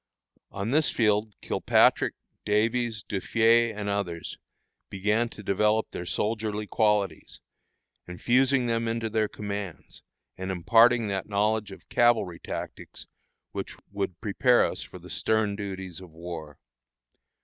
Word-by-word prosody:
On 100 +3 -4
this 155 +2 +3
field 105 -2 +1
Kilpatrick, - - +3 0.3
Davies, 110 +1 0
Duffié, 115 +3 +3
and 105 -1 -4
others, 95 -5 -3 0.5
began 105 +4 0
to 105 - -11
develop 105 +3 +1
their 90 - -6
soldierly 105 0 -1
qualities, 105 -2 0 0.7
infusing 125 +8 +2
them 115 -1 0
into 115 -1 -2
their 110 -1 +1
commands, 100 -4 -6 0.4
and 95 0 -4
imparting 115 +6 +4
that 95 +1 -3
knowledge 105 +1 +1
of 95 -3 -12
cavalry 115 -8 +2
tactics - - -7 0.5
which - - -5 0.2
would 100 -3 -3
prepare 120 +3 +3
us - - -3
for - - -9
the - - -13
stern 110 -2 0
duties 95 -4 -6
of 95 -2 -12
war. 80 -3 -8
105 Hz, 125 wpm, -27 LUFS, 95-115 Hz, 0.7 s, imparting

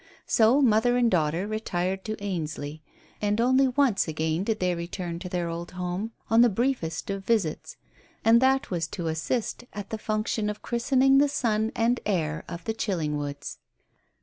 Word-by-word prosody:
So 240 +6 +4
mother 245 +1 +4
and 240 -2 +3
daughter 165 +2 +1
retired 190 -3 -2
to 215 - -2
Ainsley, 155 -5 -4 0.4
and 210 +1 +1
only 260 +3 +4
once 255 -7 +2
again 160 +2 -1
did 220 +1 -1
they 180 -1 +1
return 170 0 -5
to 180 0 -6
their 175 -1 -1
old 170 +1 -5
home 180 +4 -3 0.2
on 225 +1 +5
the 240 - +6
briefest 205 -7 -1
of 195 0 -4
visits, 190 -7 -1 0.5
and 230 +1 +6
that 265 -2 +2
was 165 -2 -1
to 165 -1 -4
assist 160 +11 -2
at 205 -1 -7
the 220 - -3
function 215 0 -1
of 210 0 -6
christening 265 +3 +3
the 290 0 +4
son 220 -5 0
and 235 +2 +2
heir 160 -6 -1
of 170 -1 -7
the 225 - -2
Chillingwoods. 150 -9 -3
205 Hz, 170 wpm, -26 LUFS, 170-230 Hz, 0.5 s, the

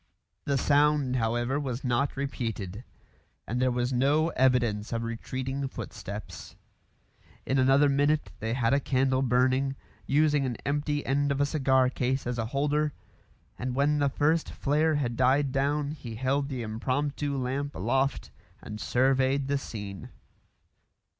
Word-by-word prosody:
The 140 -1 +1
sound, 145 -1 +3
however, 120 +4 0
was 130 -3 -4
not 130 +3 0
repeated; 115 -7 -4 0.6
and 120 +3 -2
there 130 - +3
was 125 +1 -1
no 145 +6 +2
evidence 120 -7 +1
of 115 -1 -2
retreating 130 +4 -3
footsteps. - - -8 0.9
In 135 +1 +1
another 135 +3 +5
minute 145 +2 +1
they 110 +2 -2
had 120 -1 +1
a 140 - +4
candle 130 -1 +1
burning, 130 +2 +2 0.3
using 150 0 +3
an 125 -3 -2
empty 145 +1 -1
end 140 +1 +1
of 140 - -1
a 145 - +3
cigar 130 -3 +2
case 130 +1 -1
as 120 0 -2
a 110 - -1
holder; 150 +3 0 0.7
and 125 0 -3
when 145 +2 +2
the 140 -1 +2
first 155 +4 +1
flare 155 +2 +1
had 125 -5 -1
died 130 +3 +3
down 140 +2 0
he 125 -7 -7
held 135 +4 0
the 130 -4 -4
impromptu 140 +6 -2
lamp 135 +3 -2
aloft 135 +7 0 0.3
and 105 0 -8
surveyed 135 +1 +2
the 140 0 0
scene. 100 - -7
135 Hz, 145 wpm, -28 LUFS, 125-145 Hz, 0.9 s, another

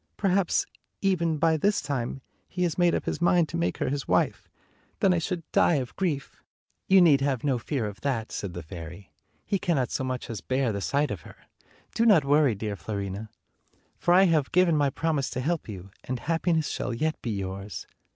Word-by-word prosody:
"Per 200 - +1
haps, 185 -1 +2 0.4
even, 170 -5 +1
by 160 +1 +3
this 205 +7 +2
time, 135 -2 -3 0.3
he 180 - -2
has 170 -3 0
made 175 -1 +3
up - - -2
his - - -3
mind 175 -1 +4
to - - -5
make 85 +1 0
her - - -1
his 140 0 -3
wife. - - +1 0.5
Then 190 - +4
I 175 - +1
should 170 +1 -3
die 170 - +4
of 130 -4 -3
grief." 160 -8 -3 0.5
"You 190 -1 +7
need 145 -5 +5
have 135 -4 0
no 135 -4 +1
fear 125 0 -2
of 105 -1 -7
that," 125 -6 -2
said 95 -4 -5
the 85 - -6
fairy; 85 +3 -9 0.3
"he 200 - 0
cannot 150 -9 0
so - - -1
much 130 -1 -3
as 110 -4 -5
bear 130 -2 0
the 100 -1 -3
sight 145 +7 0
of 95 -6 -5
her. - - -13 0.6
Do 230 - +2
not 175 -10 +6
worry, 145 -4 +4
dear 105 0 -4
Fiorina; 100 +2 -5 0.7
for 175 - +3
I 190 - +7
have 160 -7 +2
given 180 -2 +4
my 145 -2 +3
promise 145 -1 -1
to - - -4
help 155 0 -2
you, 95 -1 -8
and 130 - -3
happiness 165 +2 0
shall 115 - -3
yet 155 +6 -1
be 120 - -4
yours. 100 -1 -5
140 Hz, 210 wpm, -27 LUFS, 110-170 Hz, 0.7 s, You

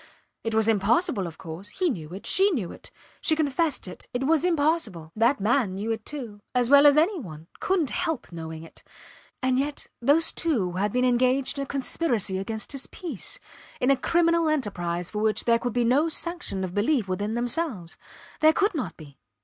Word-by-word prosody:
It 225 -1 -2
was 220 0 +3
impossible, 220 - +2
of 160 - -10
course! 165 +5 -9
He 360 - 0
knew 160 -9 -6
it. 190 +3 -8
She 390 +2 +4
knew 230 - -2
it. - - -10 0.3
She 315 - +2
confessed 305 - 0
it. 185 - -9
It 250 - 0
was 310 +2 +3
impossible! 290 - 0
That 235 +5 +3
man 215 -1 +1
knew 210 +4 -3
it, 225 -1 -4
too 235 -9 -6
as 250 +1 +2
well 285 +1 +8
as 290 0 +6
any 350 +5 +3
one; 160 - -9
couldnt 350 -8 0
help 325 - -2
knowing 160 -1 -7
it. 165 - -13 0.6
And 260 0 +2
yet 285 +1 -3 0.2
those 290 +6 +4
two 245 - 0
had 195 +3 -1
been 250 +2 +1
engaged 255 +3 +2
in - - -1
a - - -19
conspiracy 245 - 0
against 220 +3 -4
his 275 -2 -4
peace 315 - -4 0.4
in 255 - +3
a - - +5
criminal 335 +3 +2
enterprise 180 - -2
for 210 - -3
which 215 0 0
there 230 -1 +4
could 245 -1 -3
be 240 0 +1
no 280 +7 +3
sanction 340 - -2
of 180 -1 -4
belief 220 +2 +1
within 205 +4 -2
themselves. 240 - -2 0.4
There 315 0 +6
could 405 +4 +1
not 285 -9 -4
be! 145 -4 -14
245 Hz, 195 wpm, -26 LUFS, 200-310 Hz, 0.6 s, well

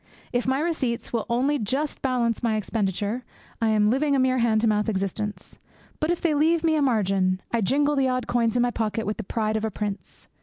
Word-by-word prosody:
If 245 +1 0
my 265 +1 +2
receipts 290 -9 -2
will 230 -3 -1
only 270 +5 +1
just 265 +7 -2
balance 245 -4 0
my 230 -3 +1
expenditure, 210 +2 -2 0.4
I 225 - +2
am 210 -1 +3
living 280 +3 +2
a - - +2
mere 255 0 +2
hand 225 -2 +2
to 230 - +2
mouth 210 0 +1
existence; 205 +1 -3 0.4
but 310 - 0
if 345 - 0
they 330 -3 +2
leave 320 +3 +2
me 320 -1 +3
a 305 - +2
margin, 195 -7 +1
I 235 - +1
jingle 285 +7 +2
the 270 -1 +2
odd 255 0 -1
coins 235 -2 +1
in 245 - +3
my 245 - +1
pocket 220 -1 -2
with 210 - -2
the 225 - -4
pride 215 +2 -1
of 215 - -3
a 220 - 0
prince. 205 0 -6
235 Hz, 225 wpm, -25 LUFS, 215-270 Hz, 0.4 s, am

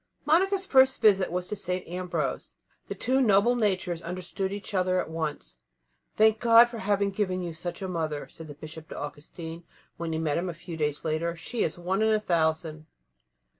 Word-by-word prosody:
Monica's 380 +5 +3
first 265 -5 +5
visit 195 -4 +4
was 180 0 -2
to - - -3
St. 180 -2 -3
Ambrose. 180 +1 -3 0.3
The - - -5
two 260 +1 +1
noble 220 +1 +4
natures 190 -6 0
understood 185 +2 -3
each 205 +1 -6
other 185 -1 +2
at - - -3
once. 160 -2 -4 0.6
"Thank 220 0 +4
God 235 0 +7
for 235 -1 -7
having 200 0 +1
given 185 -2 -1
you 170 -1 -4
such 175 +4 -6
a - - -2
mother," 160 -5 -3
said 160 -1 -11
the 145 - -9
Bishop 155 +1 -10
to - - -7
Augustine, 160 +3 -7 0.3
when 170 -1 -3
he 160 - -1
met 160 -1 0
him 180 +1 -2
a 170 - -5
few 170 0 -8
days 150 -1 -2
later; 165 +2 -1
"she 225 +7 -4
is - - 0
one 185 +4 -1
in 220 - +3
a 215 -1 +3
thousand." 160 -4 -1
180 Hz, 195 wpm, -27 LUFS, 160-210 Hz, 0.6 s, God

